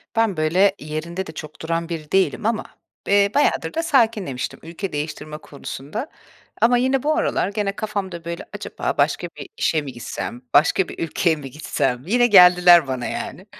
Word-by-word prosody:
Ben, 225 -5 +1
böyle, 185 +6 +3
yerinde 165 +5 -5
de - - -7
çok 155 -1 -10
duran 165 +1 -2
biri 155 -3 -6
değilim 195 +3 +1
ama, 225 0 0 0.4
eee, 200 0 +4
bayağıdır 290 - +1
da 330 - -1
sakinlemiştim 220 - 0
ülke 170 +4 -6
değiştirme 150 0 -5
konusunda. 150 - -7 0.5
Ama 245 +1 +5
yine 260 +1 +1
bu 305 +1 +2
aralar 185 - 0
gene 200 -1 -2
kafamda, 195 -5 -4
böyle: 170 0 -5
"Acaba - - -4
başka - - +1
bir - - -8
işe 160 - +1
mi 140 -2 -7
gitsem? 120 0 -6
Başka 175 +5 +4
bir - - -10
ülkeye 165 +1 +1
mi 140 -3 -9
gitsem?" 125 -3 -2
Yine 240 +4 +4
geldiler 180 - +7
bana, 130 -2 -3
yani. - - -5
175 Hz, 170 wpm, -22 LUFS, 155-210 Hz, 0.5 s, geldiler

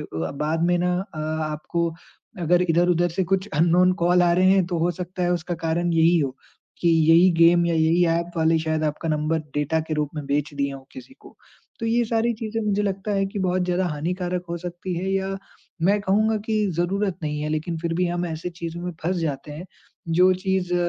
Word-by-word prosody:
अ, - - -6 0.4
बाद 160 +2 0
में 175 - +3
ना 180 0 +1 0.2
अ, 155 - -7 0.3
आपको 170 +3 -2 0.5
अगर 175 +2 +3
इधर-उधर 175 +1 +3
से 185 +3 -1
कुछ 190 +3 -1
अननोन 175 +4 +4
कॉल 180 +1 +4
आ 175 -1 +4
रहे 185 +2 +4
हैं 190 -1 +4
तो 175 -1 -2
हो 170 +2 +1
सकता 180 +1 -4
है 175 - +1
उसका 175 0 -2
कारण 170 +2 0
यही 165 +1 +4
हो, 135 -3 -2 0.4
कि 170 - +2
यही 165 +2 +5
गेम 170 +1 +6
या 170 - +1
यही 160 +2 +3
ऐप 170 +1 0
वाले 160 0 +3
शायद 160 0 -1
आपका 155 +2 -2
नंबर 155 +1 0 0.2
डेटा 150 +2 0
के 155 - -1
रूप 150 -1 -1
में 150 -2 -5
बेच 145 +1 -1
दिए 140 -1 -1
हों 135 0 -9
किसी 265 0 -12
को। - - -16 0.4
तो 230 - -2
ये 235 +1 +2
सारी 230 +1 +1
चीज़ें 225 0 -4
मुझे 205 0 +1
लगता 200 +1 -2
है 195 0 +1
कि 195 +1 -6
बहुत 185 0 +1
ज़्यादा 180 +1 0
हानिकारक 175 +3 -3
हो 170 - -2
सकती 175 +1 -5
हैं 185 +2 -2
या 195 0 -1 0.5
मैं 200 +4 +3
कहूँगा 215 +3 +2
कि 215 -1 +1
ज़रूरत 190 +2 0
नहीं 150 0 -2
है 150 - -2
लेकिन 155 +2 -2
फिर 165 0 -2
भी 180 +1 +1
हम 175 0 -2
ऐसे 165 +1 -5
चीज़ों 170 0 -5
में 180 0 -4
फँस 180 +3 0
जाते 150 -3 -3
हैं, 165 +5 -8 0.4
जो 180 +3 +4
चीज़ 185 -1 -1
175 Hz, 215 wpm, -23 LUFS, 160-185 Hz, 0.5 s, गेम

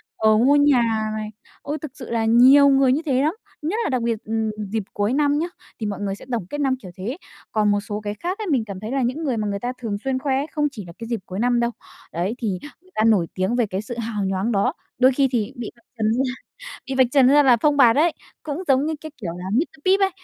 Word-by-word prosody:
ờ, 215 0 +4
mua 270 +5 +5
nhà 235 -7 +3
này." 215 0 -4 0.3
Ôi, 290 +2 -3
thực 305 - -6
sự 275 -4 -10
là 230 -1 0
nhiều 260 +5 +7
người 270 -1 +4
như 305 - 0
thế 265 -3 +2
lắm, 310 +5 +1 0.3
nhất 365 +10 -1
là - - -1
đặc 255 -3 0
biệt, 230 -2 -2
ừm, 220 0 -1 0.2
dịp 220 -2 -1
cuối 205 +3 0
năm 290 +1 +2
nhá, 335 - -1 0.3
thì 220 - -3
mọi 205 -1 -3
người 200 -1 -2
sẽ - - -13
tổng 230 -7 -1
kết 290 0 -3
năm 265 -2 +2
kiểu 185 - -10
thế. 230 - -4 0.3
Còn 210 -1 +2
một 205 - +2
số 210 0 -5
cái 205 -1 -3
khác 350 - -4
ấy, 430 -3 -5
mình 255 -8 +1
cảm 195 -3 -7
thấy 215 +3 -6
là 270 0 0
những 255 +7 -1
người 260 -6 -1
mà 210 -1 -1
người 200 0 -2
ta 245 +4 -3
thường 210 -4 -2
xuyên 265 -1 -1
khoe 270 -1 0
ấy, 285 +3 -2
không 295 -1 +1
chỉ 215 -8 -8
là 170 - -11
cái 230 - -7
dịp 235 -3 -2
cuối 185 +2 -6
năm 245 +1 +2
đâu. 235 0 +1 0.4
Đấy, 180 +7 -1
thì 230 - -3 0.3
người 370 +1 -25
ta 215 - +2
nổi 210 -7 +4
tiếng 190 +5 0
về 240 -2 +2
cái 195 -1 -3
sự 235 +2 -7
hào 220 -3 -2
nhoáng 190 +4 -1
đó. 200 -2 +1 0.2
Đôi 255 +2 +5
khi 270 +1 +2
thì 225 -5 -1
bị 240 -2 -6
vạch 235 - -27
trần 220 - 0
ra 255 +3 +1 0.6
bị 270 - -3
vạch 260 - +6
trần 275 -3 +6
ra 290 +2 +6
là 255 -4 +6
phông 290 +5 +2
bạt 245 -4 +6
ấy, 325 +3 +4 0.3
cũng 305 +3 -4
giống 270 +2 +3
như 315 - -1
cái 315 - -8
kiểu 175 -6 -4
là 180 - -7
Mr. 310 +6 -1
Pip 385 +2 +4
ấy, 390 - +3
240 Hz, 280 wpm, -22 LUFS, 215-280 Hz, 0.6 s, nhiều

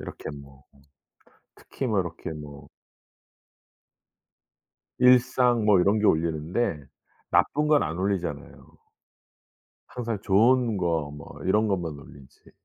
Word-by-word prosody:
이렇게 - - -8
뭐 70 -1 -18 0.9
특히 135 - -6
뭐 105 -4 +1
이렇게 85 -2 -7
뭐 75 -2 -10 2.3
일상 125 -2 +4
뭐 105 -3 +5
이런 100 +4 +2
게 105 - 0
올리는데 80 0 0 0.5
나쁜 150 +1 +2
건 150 -1 +4
안 80 +2 -4
올리잖아요. 90 -6 -4 1.1
항상 115 -4 -4
좋은 115 +3 +3
거 85 -3 0
뭐 75 -1 -11
이런 105 +3 +2
것만 90 -5 -2
올리지. 70 -1 -17
95 Hz, 205 characters per minute, -25 LUFS, 80-115 Hz, 2.3 s, 뭐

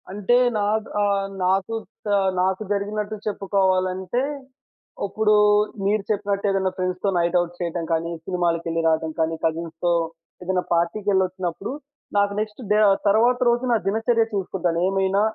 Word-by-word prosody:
అంటే 205 +4 +1 0.2
నా - - 0 0.4
ఆహ్, 200 -1 +1 0.2
నాకు 190 +3 +1 0.4
ఆహ్, 195 -1 +3
నాకు 190 +2 0
జరిగినట్టు 205 +1 -2
చెప్పుకోవాలంటే, 190 +1 0 0.9
ఇప్పుడు 215 +1 +2 0.5
మీరు 205 +1 +1
చెప్పినట్టేదైనా 200 -2 0
ఫ్రెండ్స్‌తో 185 +1 -1
నైట్ 170 +1 +2
ఔట్ 175 0 -6
చేయటం 170 -1 -3
కానీ, 165 +1 -1
సినిమాలకెళ్ళి 170 -2 -1
రావడం 160 0 +1
కానీ, 160 0 +1
కజిన్స్‌తో 165 +1 -1 0.5
ఏదైనా 180 0 0
పార్టీకెళ్ళొచ్చినప్పుడు 185 +1 -1 0.5
నాకు 200 0 +2
నెక్స్ట్ 215 +3 -4
డే 210 - +4 0.3
తరువాత 230 +5 +4
రోజు 240 +1 +1
నా - - +4
దినచర్య 225 +3 +2
చూసుకుంటాను. 180 -3 -1
ఏమైనా 195 +1 +1
190 Hz, 120 wpm, -23 LUFS, 175-205 Hz, 0.9 s, డే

